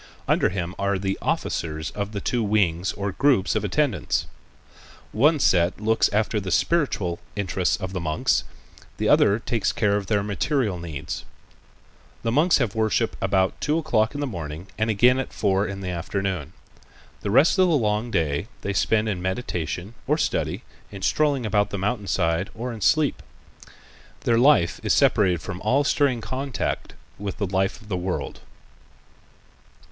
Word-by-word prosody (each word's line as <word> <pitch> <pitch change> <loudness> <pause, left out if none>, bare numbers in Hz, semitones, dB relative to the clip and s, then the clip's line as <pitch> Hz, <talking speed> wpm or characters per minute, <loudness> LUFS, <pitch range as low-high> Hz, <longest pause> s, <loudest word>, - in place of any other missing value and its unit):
Under - - +3
him 90 -1 -3
are 100 0 +1
the 95 0 -1
officers 80 -1 -2
of 100 0 -4
the 105 - -3
two 120 - 0
wings 100 -4 +1
or 100 0 -3
groups 130 -1 +2
of - - 0
attendants. 105 - 0 0.9
One 150 +9 +4
set 90 -7 +3
looks 110 +1 +2
after 105 +1 +1
the 95 -2 -5
spiritual 100 - +1 0.2
interests, 95 -3 0
of 95 -1 -5
the 95 - -2
monks; 80 -2 +1 0.5
the - - 0
other 100 - +5
takes 115 -2 -1
care 100 -2 +1
of 100 -2 -4
their 105 -2 +1
material 105 - -1
needs: 80 -5 -6 1.0
The 115 - 0
monks 155 +7 +4
have 120 -7 0
worship 110 +1 0
about 95 -1 +1
two 150 +2 +1
o'clock 120 -7 +1
in 145 - -3
the - - 0
morning 85 - -6
and 110 +1 0
again 125 +5 +4
at 135 - -2
about - - -20
four 100 -1 +1
in 100 0 -6
the 95 - -4
afternoon. 90 -2 -3 0.7
The - - -3
rest 140 - +4
of 185 - +6
the 165 - +3
long 105 -1 0
day 80 -2 -1
they 100 - -2
spend 110 +2 +2
in 95 -4 -2
meditation, 90 -1 -3
or 150 +3 +2
study, - - -1 0.3
in 100 -2 -8
strolling 140 +2 +1
about 105 -1 +1
the 100 - -4
mountain 105 +1 -2
side 85 +1 0
or 120 +2 -4
in 110 - -9
sleep. 155 +7 +2 1.0
Their 115 -1 +2
life 120 - +4
is - - +2
separated 90 -6 +3
from 90 0 -6
all 130 +7 +2
stirring 140 -4 +1
contact 130 +1 -3 0.2
with 100 -1 -4
the 100 - -1
life 95 +1 -1
of 110 - -17
the 100 - -2
world. 90 +1 -3
100 Hz, 170 wpm, -24 LUFS, 95-120 Hz, 1.0 s, of